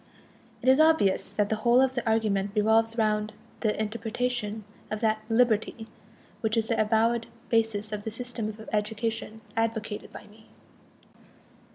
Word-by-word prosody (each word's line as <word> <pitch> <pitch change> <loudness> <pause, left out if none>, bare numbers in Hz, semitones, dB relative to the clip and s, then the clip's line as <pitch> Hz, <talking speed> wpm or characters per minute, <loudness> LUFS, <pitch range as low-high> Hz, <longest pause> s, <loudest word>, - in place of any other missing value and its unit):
It - - -3
is 265 +2 +6
obvious 315 -12 +3
that 205 -1 +1
the 220 - 0
whole 235 +3 +4
of 260 0 +3
the 245 -2 -2
argument 205 -3 +1
revolves 225 +2 +3
round 215 -1 +1 0.3
the 215 -2 0
interpretation 225 0 -2 0.3
of 215 - -3
that 220 -1 +2
"liberty" 225 -1 +2 0.5
which 220 0 0
is 225 0 0
the 230 - +2
avowed 225 +2 +2 0.2
basis 220 -2 +1
of 210 -1 -4
the 220 - -3
system 230 -1 -4
of 220 +1 -9
education 220 +1 -2
advocated 225 -2 -2
by - - -10
me. 215 +1 -19
220 Hz, 150 wpm, -27 LUFS, 215-230 Hz, 0.5 s, is